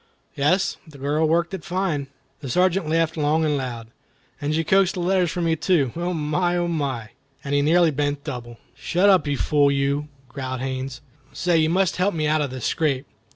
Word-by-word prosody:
"Yes; 185 +8 +1
the 150 -3 -13
girl 145 +3 +1
worked 170 +3 +1
it 185 -5 -5
fine." 175 -6 -2 0.3
The 140 -3 -7
Sergeant 180 +3 +2
laughed 165 0 +1
long 155 +1 +2
and 150 -1 +1
loud. 125 -4 -4 0.6
"And 145 +1 -1
she 165 - +1
coaxed 190 +3 +3
the - - -3
letters 180 0 +2
from 170 0 -1
you 165 - +2
too. 155 -6 +1
Oh, 175 +2 -2
my! 175 +2 0
Oh, 175 0 0
my!" 135 -9 -2 0.3
And 140 -1 -3
he 145 - +3
nearly 165 +2 +4
bent 145 0 -2
double. 120 -5 -6 0.2
"Shut 190 +4 +2
up, 185 -5 +3
you 145 -1 0
fool 145 0 +3
you!" 140 +1 0 0.2
growled 130 -1 -5
Haines. 130 -1 -4 0.3
"Say, 175 -2 +1
you 155 0 +2
must 185 +1 +1
help 185 +1 +1
me 155 -1 0
out 155 0 +2
of 145 - -1
this 130 -1 -6
scrape." 145 -4 0
155 Hz, 200 wpm, -23 LUFS, 140-175 Hz, 0.6 s, nearly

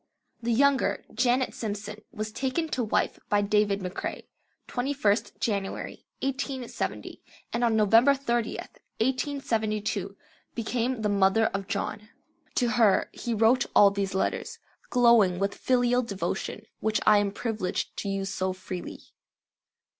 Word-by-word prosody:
The 235 0 -1
younger, 275 +3 +2
Janet 250 +2 +2
Simpson, 210 -1 -5
was 215 -2 -4
taken 270 +7 -1
to 255 -4 -1
wife 215 - 0
by 205 0 +3
David 205 -1 +2
McCrae, 180 0 -4 0.4
21st 245 -5 0
January, 200 -3 -3 0.2
1870, 270 -2 -3 0.3
and 235 - 0
on 230 -2 +3
November 225 +6 +5
30th, 240 -4 -3 0.2
1872, 220 -6 -1 0.4
became 240 +1 -1
the - - +2
mother 200 +2 +3
of 195 -1 -3
John. 210 0 -3 0.5
To 245 - +2
her 220 -3 +3
he 235 -1 -3
wrote 230 +3 +4
all 200 -1 +8
these 195 -1 -2
letters, 190 - -1 0.3
glowing 235 -7 +5
with 200 +1 0
filial 245 -1 +2
devotion, 205 -5 -4
which 220 -1 +1
I 210 - +7
am 205 -1 0
privileged 210 -3 -3
to 200 - -3
use 195 0 -2
so 185 0 -1
freely. 185 -1 -7
220 Hz, 130 wpm, -27 LUFS, 200-245 Hz, 0.5 s, all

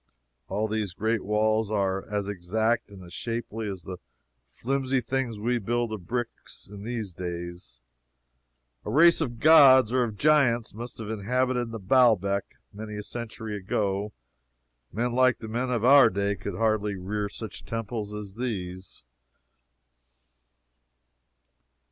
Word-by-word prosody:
All 105 +3 -1
these 105 -4 -2
great 110 +1 0
walls 110 +1 +1
are 95 -2 -1
as 105 -1 -2
exact 110 +5 -1
and 95 -3 -12
shapely 115 -2 -4
as 95 -3 -6
the 90 -1 -7 0.5
flimsy 135 - -1
things 125 -2 -2
we 120 +3 0
build 120 +1 -1
of 95 -6 -7
bricks 120 0 -5
in 100 0 -10
these 110 -4 -4
days. 85 -8 -7 1.0
A - - -6
race 165 +8 +5
of 120 -6 -3
gods 135 -6 +7
or 130 0 +2
of 110 -3 -4
giants 130 -5 +3
must 120 +3 -7
have 110 -1 -5
inhabited 125 +3 0 0.2
Baalbec 100 -6 +3 0.2
many 105 +1 -7
a 105 - -5
century 110 -1 -6
ago. 100 +1 -2 0.8
Men 120 +2 -1
like 130 -1 +4
the 110 - -8
men 120 +4 -2
of 120 -2 0
our 140 +1 +8
day 100 +1 -1
could 100 -1 -6
hardly 110 -2 0
rear 100 +2 -3
such - - -8
temples 115 -2 -4
as 105 -2 -7
these. 95 - -5
110 Hz, 135 wpm, -27 LUFS, 100-120 Hz, 1.0 s, our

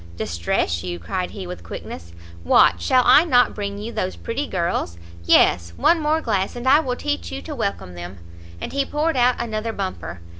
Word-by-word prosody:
"Distress 85 0 -1
you?" 90 -1 -4
cried 135 - -3
he, 195 -2 -8
with 180 0 -7
quickness, 85 0 -8 0.3
"what 85 +1 +4
shall 255 - +3
I 305 - +7
not 250 -7 +3
bring 200 -1 -4
you 215 +3 -6
those 185 -5 -3
pretty 275 +5 -4
girls? 170 - -2 0.3
Yes, 85 0 +4
one 340 - +4
more 310 +1 +1
glass, 195 -7 -1
and 240 +1 -5
I 280 +3 +7
will 255 -6 -2
teach 90 - -3
you 90 - -4
to - - -6
welcome 90 - -3
them." 90 +2 -8 0.4
And - - -6
he 280 0 +1
poured 300 +3 -1
out 250 0 +3
another 225 -1 -3
bumper. 85 - -5
195 Hz, 190 wpm, -22 LUFS, -, 0.4 s, I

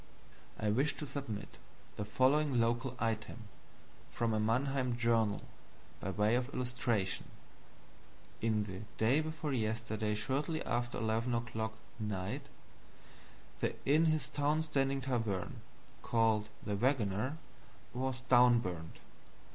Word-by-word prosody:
I 105 -1 +1
wish 135 +7 +2
to 150 - -4
submit 135 -8 -5 0.4
the 105 0 -3
following 135 +2 +3
local 120 +2 +1
item, 115 +1 -2 0.7
from 115 -1 0
a 110 - +2
Mannheim 125 +2 +1
journal, 115 -3 +2 0.6
by 100 - -3
way 105 +3 +2
of 125 +1 +1
illustration: 120 -6 -1 1.1
"In 110 -2 +2
the 95 -1 -6 0.2
daybeforeyesterdayshortlyaftereleveno'clock 120 -3 0 0.3
Night, 100 -3 -3 1.1
the - - 0
inthistownstandingtavern 140 - +1 0.5
called 110 -2 +2 0.2
'The 105 -1 -1
Wagoner' 125 +2 +1 0.6
was 130 0 -2
downburnt. 120 -10 +4
120 Hz, 85 wpm, -34 LUFS, 110-135 Hz, 1.1 s, downburnt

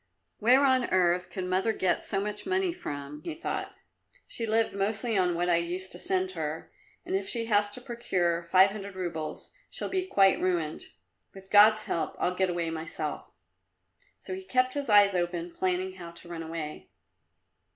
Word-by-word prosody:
"Where 255 +6 +5
on 260 -2 +3
earth 180 0 +2
could 185 +1 -5
mother 185 +5 +1
get 185 -4 0
so 195 - -1
much 210 - -4
money 375 -1 +1
from?" 145 - -7
he 330 - -5
thought. 330 - -4 0.5
"She 230 - -4
lived 225 +1 +2
mostly 215 +4 -1
on 180 -3 +2
what 175 +1 0
I 175 -1 +4
used 180 +2 -3
to - - -8
send 375 0 -1
her, - - -5 0.3
and 365 +2 -2
if 390 +1 -2
she 230 -2 -1
has 205 -2 +2
to 230 +5 -7
procure 185 -9 -1
five 185 +3 +5
hundred 200 -2 -7
roubles 165 -4 -5 0.2
she'll - - -4
be 375 -1 -1
quite 195 - +4
ruined. 170 -4 -1 0.5
With 190 0 -13
God's 215 +1 +7
help 165 - -2
I'll 180 - 0
get 190 0 +1
away 170 -2 -1
myself." 160 -1 -5 0.9
So - - -8
he 380 +1 -6
kept 255 -6 +1
his 285 -3 -3
eyes 205 -1 +6
open, 175 -1 -2
planning 185 +1 -1
how 170 -2 -8
to 170 +1 -12
run 170 -1 -6
away. 160 -2 -6
190 Hz, 180 wpm, -28 LUFS, 175-230 Hz, 0.9 s, God's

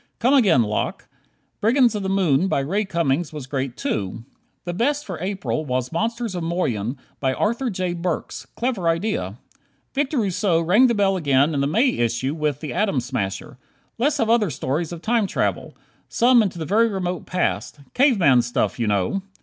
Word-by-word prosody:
Come 250 +4 +2
again, 195 - +5
Locke! 105 -1 -3 0.5
"Brigands 240 +2 +3
of 210 - -3
the 190 - -2
Moon," 185 -4 +2
by 165 - +1
Ray 195 +10 -1
Cummings 170 -3 0
was 150 -4 -7
great 130 -2 -3
too. 105 +2 -3 0.4
The 175 - -3
best 285 +9 0
for 180 -4 -6
April 190 -4 -2
was 130 -3 -2
"Monsters 230 +4 -2
of 175 - -3
Moyen," 135 - -2 0.2
by 130 -1 0
Arthur 235 +4 0
J. 185 -3 -2
Burks. 170 -7 -4
Clever 230 -9 -1
idea. 165 - -1 0.6
Victor 285 +1 -1
Rousseau 195 -5 +1
rang 195 +10 +4
the 235 - +1
bell 195 -2 +2
again 140 -1 +2
in 140 - 0
the 140 - +1
May 225 - +3
issue 120 +4 0
with 150 -4 -2
"The 155 - -5
Atom 195 -10 +1
Smasher." 125 +2 -4 0.4
Let's 285 +5 +2
have 225 - +1
other 225 -4 +3
stories 150 +3 -2
of 170 -1 -8
time 225 -2 +1
travel - - -2 0.3
some 240 0 +5
into 195 -5 -2
the 160 - -4
very 220 +7 +3
remote 185 -4 -3
past. 180 -4 -2
Cave 260 -2 +4
man 135 -9 +5
stuff, 120 +1 -1
you 115 - 0
know! 100 - 0
175 Hz, 180 wpm, -22 LUFS, 135-215 Hz, 0.6 s, again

